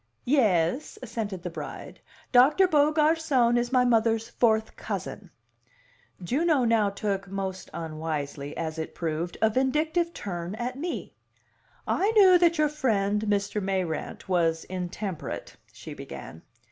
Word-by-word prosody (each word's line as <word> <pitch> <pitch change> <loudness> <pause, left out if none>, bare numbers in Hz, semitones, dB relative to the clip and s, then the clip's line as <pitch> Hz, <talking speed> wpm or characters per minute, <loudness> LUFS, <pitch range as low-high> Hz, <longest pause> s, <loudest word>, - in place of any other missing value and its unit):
"Yais," 225 - +2
assented 215 -6 -4
the 180 - -3
bride. - - -8 0.3
"Doctor 280 +10 +6
Beaugarcon 300 -5 +3
is 240 0 0
my 250 -1 +4
mother's 225 -1 +2
fourth 220 -2 +1
cousin." - - -6 0.9
Juno 285 - +2
now 225 -3 +3
took 200 -1 -3
most 190 -1 -5
unwisely, 155 -3 -5
as 160 -1 -3
it 160 - -5
proved 165 +1 -3
a 220 - +6
vindictive 310 +7 +1
turn 175 - -5
at 245 +3 -4
me. 335 +6 -5 0.7
"I 395 - +1
knew 380 -4 +7
that 340 -1 +3
your 305 0 +3
friend, 210 -9 0
Mr. 205 0 0
Mayrant, 185 -4 -3
was 165 -3 +1
intemperate," 185 0 -5 0.2
she - - -10
began. 80 - -9
220 Hz, 125 wpm, -27 LUFS, 180-275 Hz, 0.9 s, knew